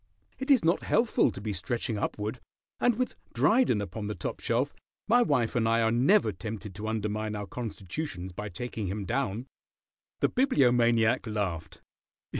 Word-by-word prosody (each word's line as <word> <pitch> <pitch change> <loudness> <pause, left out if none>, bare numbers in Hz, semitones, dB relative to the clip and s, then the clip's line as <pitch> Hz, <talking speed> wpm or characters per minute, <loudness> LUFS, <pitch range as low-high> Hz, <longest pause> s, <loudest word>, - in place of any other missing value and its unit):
It 265 +2 -5
is 265 - +5
not 170 +2 +3
healthful 230 - +3
to 95 - -7
be 105 +1 -3
stretching 105 +4 -2
upward, 105 +4 -3 0.4
and 245 -2 +3
with 255 +2 -2 0.2
Dryden 220 - +3
upon 100 +2 -5
the 105 - -3
top - - -4
shelf 125 +5 0 0.3
my 240 +3 +5
wife 130 - +2
and 115 -2 +2
I 115 0 +3
are 110 - +3
never 130 - +4
tempted 105 +2 -6
to 105 +3 -6
undermine 110 0 -2
our 105 0 -4
constitutions 100 - -5
by 105 +4 -6
taking 110 +2 -4
him 100 +2 -3
down." 120 -1 -1 0.7
The - - +3
Bibliomaniac 120 - +3
laughed. 95 -7 -3
110 Hz, 160 wpm, -29 LUFS, 105-130 Hz, 0.7 s, is